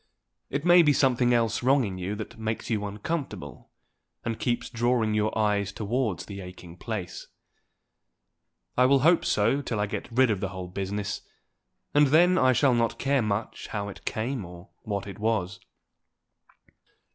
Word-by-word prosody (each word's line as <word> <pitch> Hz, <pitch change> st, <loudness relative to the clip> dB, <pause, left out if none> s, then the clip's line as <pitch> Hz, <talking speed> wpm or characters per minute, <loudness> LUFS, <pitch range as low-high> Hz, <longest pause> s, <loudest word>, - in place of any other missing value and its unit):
It 140 Hz, +3 st, -3 dB
may 175 Hz, 0 st, +8 dB
be 150 Hz, -3 st, +4 dB
something 125 Hz, -3 st, +3 dB
else 115 Hz, -2 st, +1 dB
wrong 135 Hz, +2 st, +4 dB
in 95 Hz, -4 st, -4 dB
you 95 Hz, +3 st, -3 dB
that 110 Hz, +1 st, -8 dB
makes 110 Hz, +1 st, -3 dB
you 105 Hz, -2 st, 0 dB
uncomfortable, 105 Hz, -, -5 dB, 0.6 s
and 115 Hz, -2 st, -3 dB
keeps 120 Hz, -1 st, -1 dB
drawing 120 Hz, -2 st, +1 dB
your 105 Hz, +1 st, 0 dB
eyes 105 Hz, -2 st, +1 dB
towards 110 Hz, 0 st, -2 dB
the 100 Hz, -1 st, -7 dB
aching 90 Hz, -2 st, -11 dB
place. 100 Hz, -2 st, -6 dB, 1.5 s
I 125 Hz, 0 st, +5 dB
will 135 Hz, 0 st, +4 dB
hope 165 Hz, +4 st, +4 dB
so 120 Hz, +7 st, +2 dB
till 115 Hz, -6 st, -3 dB
I 105 Hz, -, +2 dB
get 105 Hz, +4 st, -6 dB
rid 125 Hz, 0 st, +4 dB
of 100 Hz, -, -1 dB
the 95 Hz, -, -2 dB
whole 95 Hz, -2 st, -7 dB
business, 100 Hz, +2 st, -3 dB, 0.7 s
and 145 Hz, 0 st, +5 dB
then 175 Hz, +6 st, +5 dB
I 130 Hz, -, +5 dB
shall 130 Hz, +1 st, +3 dB
not 115 Hz, -1 st, +1 dB
care 140 Hz, -1 st, +1 dB
much 105 Hz, 0 st, -3 dB
how 100 Hz, -1 st, -4 dB
it 100 Hz, -, -11 dB
came 115 Hz, +1 st, -2 dB
or 85 Hz, +1 st, -11 dB
what 100 Hz, -3 st, -3 dB
it 100 Hz, -1 st, -9 dB
was. 100 Hz, -4 st, -1 dB
110 Hz, 165 wpm, -27 LUFS, 100-130 Hz, 1.5 s, may